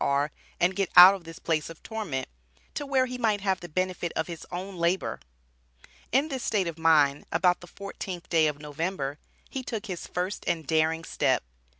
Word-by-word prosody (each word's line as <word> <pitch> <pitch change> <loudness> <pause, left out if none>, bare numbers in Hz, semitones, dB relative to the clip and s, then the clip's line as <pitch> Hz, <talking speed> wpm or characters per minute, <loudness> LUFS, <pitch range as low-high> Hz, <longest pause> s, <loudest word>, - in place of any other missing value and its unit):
R., 140 +2 +1 0.3
and 180 +2 +2
get 195 -2 0
out 180 +2 +12
of 190 -4 -7
this 165 +1 -9
"place 160 -4 -1
of 165 - -12
torment," 200 - -4 0.5
to 290 - -4
where 265 -2 +3
he 250 0 -6
might 215 -4 +1
have 190 -2 +1
the 175 - -9
benefit 180 +1 -1
of 160 - 0
his 170 -2 -8
own 185 +2 -5
labor. 170 +2 0 0.9
In 270 +6 +3
this 265 -3 -3
state 200 -4 +1
of 165 -1 -5
mind, 150 -3 +4
about 180 +2 +2
the 175 - -11
fourteenth 185 -1 -7
day 160 -2 +4
of 150 -1 -2
November, 150 -1 -3 0.3
he 265 - -4
took 230 -3 -5
his 185 -5 -5
first 180 +3 -3
and 160 -2 0
daring 160 +2 +1
step. - - +1
175 Hz, 195 wpm, -27 LUFS, 160-195 Hz, 0.9 s, out